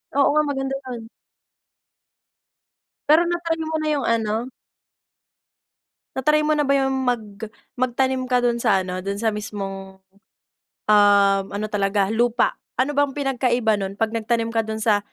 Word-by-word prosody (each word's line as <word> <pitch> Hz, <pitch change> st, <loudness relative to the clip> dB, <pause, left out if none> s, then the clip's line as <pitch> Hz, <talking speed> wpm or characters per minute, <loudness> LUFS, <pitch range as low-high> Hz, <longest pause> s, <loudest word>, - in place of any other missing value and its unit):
Oo 280 Hz, -, +4 dB
nga, 305 Hz, -, +4 dB
maganda 270 Hz, -1 st, -2 dB
'yon. 235 Hz, -3 st, -7 dB, 2.0 s
Pero 320 Hz, +3 st, +6 dB
na-try 340 Hz, -1 st, -1 dB
mo 315 Hz, 0 st, -2 dB
na 310 Hz, -, -2 dB
yung 280 Hz, -, -2 dB
ano 230 Hz, +2 st, -1 dB, 1.7 s
Na-try 300 Hz, +3 st, +2 dB
mo 310 Hz, -, +2 dB
na 295 Hz, -, +1 dB
ba 280 Hz, 0 st, +2 dB
yung 270 Hz, 0 st, +1 dB
mag 240 Hz, -3 st, +1 dB, 0.5 s
magtanim 255 Hz, +1 st, 0 dB
ka 250 Hz, -1 st, +3 dB
do'n 240 Hz, -1 st, 0 dB
sa 195 Hz, -2 st, +3 dB
ano, 185 Hz, 0 st, -5 dB
do'n 200 Hz, +1 st, -3 dB
sa 220 Hz, -2 st, 0 dB
mismong, 195 Hz, -2 st, -6 dB, 0.9 s
um, 200 Hz, -2 st, +5 dB
ano 205 Hz, +1 st, -3 dB
talaga 200 Hz, -1 st, 0 dB
lupa? 240 Hz, +1 st, +1 dB, 0.2 s
Ano 270 Hz, +3 st, +2 dB
bang 285 Hz, -1 st, +2 dB
pinagkaiba 250 Hz, -5 st, +1 dB
nun 195 Hz, 0 st, -4 dB
'pag 220 Hz, +1 st, -1 dB
nagtanim 230 Hz, 0 st, -1 dB
ka 225 Hz, -, 0 dB
dun 220 Hz, 0 st, -5 dB
sa 210 Hz, -2 st, +3 dB
230 Hz, 145 wpm, -22 LUFS, 205-270 Hz, 2.0 s, Pero